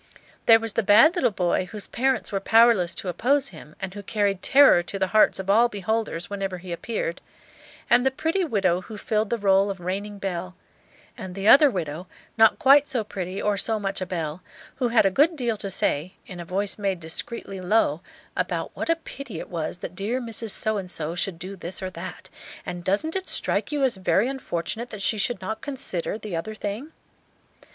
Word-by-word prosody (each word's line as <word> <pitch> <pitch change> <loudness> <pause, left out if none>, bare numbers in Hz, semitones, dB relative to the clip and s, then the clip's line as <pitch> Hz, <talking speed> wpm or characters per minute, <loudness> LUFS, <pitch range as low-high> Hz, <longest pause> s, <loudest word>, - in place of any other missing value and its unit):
There 225 -1 +8
was 225 -1 -2
the - - +1
bad 215 - +6
little 285 -10 +2
boy, 180 -3 0
whose 210 +2 -7
parents 265 +3 -1
were 195 - 0
powerless 220 -4 +4
to - - -5
oppose 265 - +1
him, 155 -2 -13
and 190 -1 -5
who 205 - -7
carried 200 -1 -1
terror 275 -10 +6
to 175 +3 -6
the 190 - +1
hearts 215 - +5
of 190 - -5
all 225 +5 +4
beholders 205 -4 -2
whenever 195 -2 -4
he 180 0 -9
appeared; 170 -1 -3 0.7
and 240 +1 +4
the 265 - +4
pretty 320 +7 -1
widow 190 - +1
who 215 +3 -10
filled 215 +1 -1
the 235 - 0
role 195 -1 +3
of 195 -2 -5
reigning 200 +4 -4
belle; 185 -2 -4 0.6
and 190 -6 -8
the 195 +1 -2
other 285 +5 +8
widow, 175 - -4 0.3
not 225 -1 +5
quite 280 +2 +6
so 240 -4 -1
pretty 190 -2 -5
or 205 -1 0
so 220 +2 0
much 195 -1 -3
a 185 - -3
belle, 165 -2 -4 0.4
who 255 - +1
had 230 -3 +3
a 195 - +3
good 300 - +3
deal 240 -6 -1
to 200 - -5
say, 175 -1 0
in 180 -2 -9
a 170 - -6
voice 195 +4 -1
made 195 -3 -1
discreetly 190 +4 -3
low, 180 -5 +2 0.3
about - - -2
what - - -4
a 330 - +4
pity 275 - -9
it - - -8
was 170 0 -3
that - - -7
dear 205 +7 -2
Mrs. 230 -2 -4
So 220 +1 +1
and 185 -2 -5
so 160 -2 -3
should 180 0 -2
do 185 +3 -7
this 180 0 -3
or 185 -1 -5
that, - - -8 0.4
and 175 0 -6
"Doesn't 210 - 0
it 380 0 -3
strike - - -1
you 290 -2 0
as 255 -6 +1
very 190 +4 +2
unfortunate 235 -3 -4
that 210 -2 -6
she 215 - +1
should 200 -2 -1
not 220 +4 -4
consider" 260 -10 -3
the 210 -5 -6
other 215 +7 -4
thing? 215 +9 -5
200 Hz, 210 wpm, -24 LUFS, 185-235 Hz, 0.7 s, There